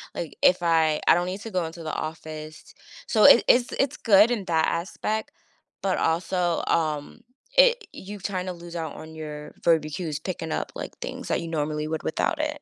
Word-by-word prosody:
Like, 165 - -5
if 180 -1 +4
I 160 -2 +3
I - - +9
don't 175 +1 0
need 185 +2 -5
to 225 - -7
go 180 -3 0
into 165 +1 -8
the 155 - -4
office. 155 0 -7 0.3
So, 215 -2 +3
it - - +9
it's 245 0 +4
it's 275 +2 0
good 210 +1 +5
in 215 -5 -1
that 160 -3 +2
aspect, 215 +5 -2 0.6
but 195 -1 0
also, 170 +1 0
um, 155 -3 -1 0.4
it - - +5
you've 200 0 -9
trying 185 -2 -2
to 185 - -3
lose 170 0 -11
out 160 -2 -4
on 160 0 -10
your 150 -1 -7
verbal 160 -2 +3
cues 155 -2 -4
picking 160 -1 -5
up, - - -3
like, - - -7
things - - -6
that - - 0
you 170 - -6
normally 150 -1 -2
would 160 -1 -3
without 310 - -1
it. 300 -1 -2
170 Hz, 200 wpm, -25 LUFS, 160-195 Hz, 0.6 s, I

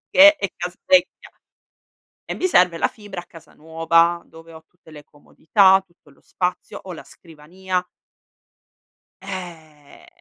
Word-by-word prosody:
che 300 +2 +8
è 200 -8 -3
casa 180 0 -7
vecchia 275 -1 +1 0.9
e - - -6
mi 370 - -3
serve 180 - +3
la - - +1
fibra 205 -5 -10
a 175 - -10
casa 165 -2 -17
nuova, 165 +2 +1
dove 165 0 -16
ho 160 0 -14
tutte 175 -1 -22
le 150 -1 -13
comodità, 190 +6 +2
tutto 170 -4 -27
lo 140 - -24
spazio, 180 -1 -4
ho 185 - -9
la 165 - -11
scrivania 180 +3 -6 1.4
eh, 165 -6 -10
175 Hz, 140 wpm, -21 LUFS, 160-190 Hz, 1.4 s, che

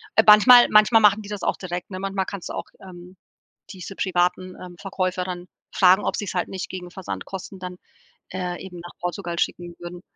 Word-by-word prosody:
Äh, 220 - +6
manchmal- 240 +4 +8
manchmal 215 +1 +5
machen 210 +1 +4
die 200 - -10
das 205 -1 -5
auch - - 0
direkt, 180 0 -6
ne? 185 -1 -6
Manchmal 195 0 -2
kannst 195 -2 -7
du - - -5
auch, - - -5
ähm, 180 0 -13 0.5
diese 190 0 -9
privaten, 185 0 -1
ähm, 180 -1 -10
Verkäufer 185 -2 -2
dann 180 -1 -6 0.2
fragen, 190 +2 +4
ob - - -1
sie's 205 -3 -4
halt 180 - 0
nicht 190 - -6
gegen 180 -2 -8
Versandkosten 190 0 -7
dann, 180 -1 -7 0.5
äh, 180 -1 -4
eben 180 -2 -9
nach 175 +1 -11
Portugal 175 -1 -4
schicken 175 -1 -3
würden, 175 0 -9
185 Hz, 195 wpm, -23 LUFS, 180-195 Hz, 0.5 s, manchmal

